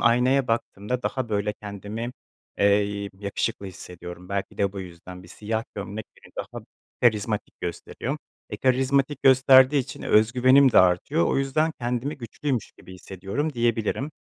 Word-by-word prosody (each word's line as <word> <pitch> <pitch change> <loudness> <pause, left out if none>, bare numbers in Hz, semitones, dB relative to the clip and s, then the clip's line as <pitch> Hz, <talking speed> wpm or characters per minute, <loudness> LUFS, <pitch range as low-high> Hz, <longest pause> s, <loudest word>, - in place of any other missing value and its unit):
aynaya 125 +3 +3
baktığımda 115 +1 -2
daha, 130 -1 -2
böyle, 105 -1 0
kendimi, 105 +3 -5 0.5
eee, 100 0 +2
yakışıklı 100 0 -3
hissediyorum, 90 -1 -9
belki 100 0 -4
de 100 -1 +1
bu 100 - -5
yüzden 90 0 -10
bir 90 - -15
siyah 110 +4 -3
gömlek 100 +2 -6 0.2
beni - - -17
daha - - -6 0.4
karizmatik 110 -2 +1
gösteriyor. - - -4 0.3
E, - - -4
karizmatik 135 +2 +1
gösterdiği 130 +1 +6
için 130 - -5
öz 110 +2 +4
güvenim 130 +1 +5
de - - +7
artıyor, 90 -2 +3
o - - +1
yüzden 155 +4 +1
kendimi 125 +5 -2
güçlüymüş 125 +1 -3
gibi 95 - -12
hissediyorum, 95 - -4
diyebilirim. 120 +3 0
115 Hz, 145 wpm, -25 LUFS, 100-130 Hz, 0.5 s, de